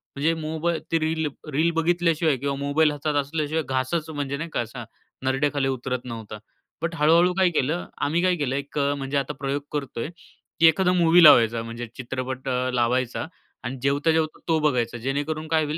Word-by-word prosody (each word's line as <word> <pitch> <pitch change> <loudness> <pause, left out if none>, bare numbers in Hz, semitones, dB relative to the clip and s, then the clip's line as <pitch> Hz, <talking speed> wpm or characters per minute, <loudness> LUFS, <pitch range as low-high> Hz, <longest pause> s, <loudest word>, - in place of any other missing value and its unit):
म्हणजे 150 +4 +1
मोबाई 160 +2 -1
ते 165 - +3
reel 160 0 0 0.3
reel 160 +4 +3
बघितल्याशिवाय 165 -2 +2
किंवा 140 +2 -2
मोबाईल 145 +3 +2
हातात 145 +1 -2
असल्याशिवाय 155 +2 -2
घासच 135 +5 -1
म्हणजे 140 -2 -3
नाही 165 +2 -5
का, - - -3
असा 120 +1 -7 0.4
नरड्याखाली 135 +1 +1
उतरत 130 -1 -3
नव्हता. 110 -3 -7 0.4
बट 165 0 -2
हळू-हळू 165 +4 +4
काय 185 -1 +3
केलं 160 +2 -1 0.2
आम्ही 160 +4 +1
काय 180 -1 +3
केलं 140 -4 -2
एक 140 +1 -5
अ, 140 0 +2
म्हणजे 135 +1 -2
आता 140 +1 -1
प्रयोग 140 +1 -2
करतोय, 140 -2 -4 0.5
की 165 - +7
एखादा 180 +3 +3
मूवी 175 -1 +5
लावायचा 115 -6 +7
म्हणजे 115 +1 -6
चित्रपट 130 +1 -5
अ, 125 0 0
लावायचा 125 +2 0 0.4
आणि 130 +2 -4
जेवता-जेवता 155 +3 +1
तो 160 -1 +2
बघायचा. 125 -6 0
जेणेकरून 145 +5 -3
काय 160 0 +2
होईल 150 +2 -3
145 Hz, 175 wpm, -24 LUFS, 130-160 Hz, 0.5 s, की